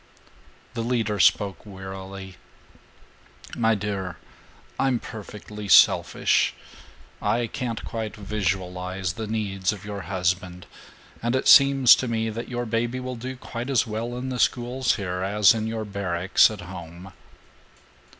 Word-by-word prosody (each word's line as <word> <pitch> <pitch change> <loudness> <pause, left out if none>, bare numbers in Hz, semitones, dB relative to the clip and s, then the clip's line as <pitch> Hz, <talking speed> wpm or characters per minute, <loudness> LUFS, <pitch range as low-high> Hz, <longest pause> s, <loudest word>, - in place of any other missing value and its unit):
The 115 - -3
leader 115 -3 -1
spoke 100 +1 +3
wearily: 95 -1 -9 1.2
"My 115 -1 +2
dear, 95 -4 -4 0.6
I'm 135 -2 +2
perfectly 105 -2 -9
selfish. - - +4 0.7
I 120 0 +1
can't 115 -1 -4
quite 110 -2 -5
visualize 95 -3 -3
the 110 +3 -5
needs 100 -3 -1
of 100 -2 -8
your 100 -1 -5
husband, 90 -1 -1 0.6
and 120 +2 0
it 130 - 0
seems 135 -3 +8
to 130 - -2
me 115 -1 -1
that 115 +2 -6
your 120 -1 -3
baby 120 +2 -1
will 125 0 -5
do 130 +3 -6
quite 120 0 -6
as 130 -3 +2
well 115 +2 -4
in 130 +1 -4
the 125 -1 -4
schools 125 +2 +1
here 90 -3 -3
as 100 +2 +4
in 110 -1 -2
your 110 -1 -3
barracks 95 -3 +2
at 105 -3 -7
home." 90 0 -10
105 Hz, 135 wpm, -25 LUFS, 95-120 Hz, 1.2 s, seems